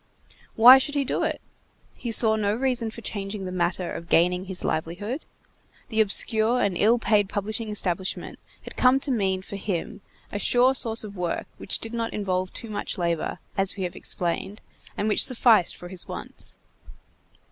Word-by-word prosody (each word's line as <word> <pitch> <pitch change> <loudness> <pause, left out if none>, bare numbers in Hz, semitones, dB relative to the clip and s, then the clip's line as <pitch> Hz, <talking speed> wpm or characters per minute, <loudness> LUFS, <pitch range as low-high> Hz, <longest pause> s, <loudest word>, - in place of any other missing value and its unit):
Why 250 +4 +9
should 290 +2 -3
he 280 -1 +1
do - - -1
it? - - -2 0.5
He 235 - -5
saw 220 -1 +5
no 210 -1 0
reason 245 -2 -1
for 230 +1 -10
changing 200 -2 -5
the 185 - -5
manner 175 0 -1
of 170 - -7
gaining 180 +2 +2
his 185 -1 -4
livelihood! 205 - -3 0.6
The 220 -1 +2
obscure 220 +3 +2
and 200 -5 0
ill 220 +6 +3
paid 210 -3 +2
publishing 215 +2 -3
establishment 190 -3 -3 0.2
had - - -10
come 255 +1 +4
to 275 - +1
mean 190 -5 0
for 200 - -7
him 200 +2 -4 0.3
a 205 - -3
sure 250 +5 +4
source 230 -3 -1
of 205 -1 -9
work 175 -2 -3
which - - -2
did 225 +1 -6
not 230 -1 -3
involve 185 -2 -2
too 230 - -7
much 205 0 -3
labor, 170 -2 -1 0.2
as 195 -1 +1
we 195 - -4
have 180 - -4
explained, 185 +4 -2 0.4
and 210 - -1
which 215 - +5
sufficed 230 -7 +4
for 175 - -10
his 180 -1 -2
wants. - - -7
205 Hz, 180 wpm, -25 LUFS, 185-230 Hz, 0.6 s, Why